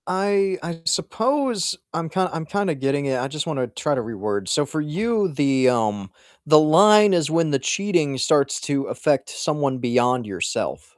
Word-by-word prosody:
I 195 0 0
I 165 0 -6
suppose 220 - 0 0.2
I'm 165 -1 -3
kind 185 +2 0
I'm 165 -1 -4
kinda 200 +1 -1
getting 135 +1 -1
it, 130 -2 -1
I 130 - -2
just 150 +1 -4
wanna 135 -7 -2
try 150 +4 -2
to 130 - -1
reword. 105 -3 -4
So 150 +8 +1
for 155 +2 -4
you, 205 +7 -1
the, 135 -3 +2
um 105 -5 -1 0.3
the 155 0 +6
line 205 +6 +6
is 165 -4 +1
when 165 -1 +1
the 140 - +1
cheating 170 -3 0
starts 140 +1 +1
to 140 -2 -2
affect 145 -3 -1
someone 145 -4 -2
beyond 125 0 +1
yourself. 100 -2 -4
150 Hz, 175 wpm, -22 LUFS, 130-185 Hz, 0.3 s, the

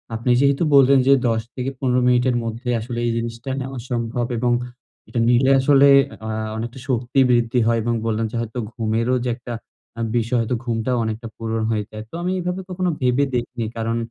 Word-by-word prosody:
আপনি 115 +3 -2
যেহেতু 140 +3 +3
বললে, 135 -1 +7
ন - - +4
যে, 140 - +7 0.2
১০-১৫ 125 +3 -1
মিনিটের 125 0 +3
মধ্যে 115 +2 -6
আসলে 120 +1 -5
এই 120 - +1
জিনিসটা 115 +2 -5
নেওয়া 130 -1 -5
সম্ভব, 120 0 -1
এবং 120 +1 +1 0.6
এটা 120 - -3
নিলে 130 +2 +4
আসলে 140 0 +5 0.4
আ - - -3 0.3
অনেকটা 120 +3 -5
শক্তি 125 +1 0
বৃদ্ধি 120 0 +2
হয়, 115 -1 +2
এবং 120 +1 0
বললেন 115 0 0
যে, - - -6
হয়তো 115 +2 -5
ঘুমেরও 115 +2 0
যে, 125 - -1
একটা 120 0 -8 0.4
আ - - -3 0.2
বিষয়, 115 +2 0
হয়তো 115 +2 -1
ঘুমটাও 120 +1 -1
অনেকটা 110 +1 -4
পূরণ 115 0 -2
হয়ে 105 -1 0
যায়। 110 0 -7
তো - - -51
আমি 180 - 0
এভাবে 180 +1 -3
কখনো 185 0 -1
ভেবে 125 +2 +2
দেখিনি। 120 -1 -3
কারণ 115 +1 -1
120 Hz, 185 wpm, -21 LUFS, 115-130 Hz, 0.6 s, বললে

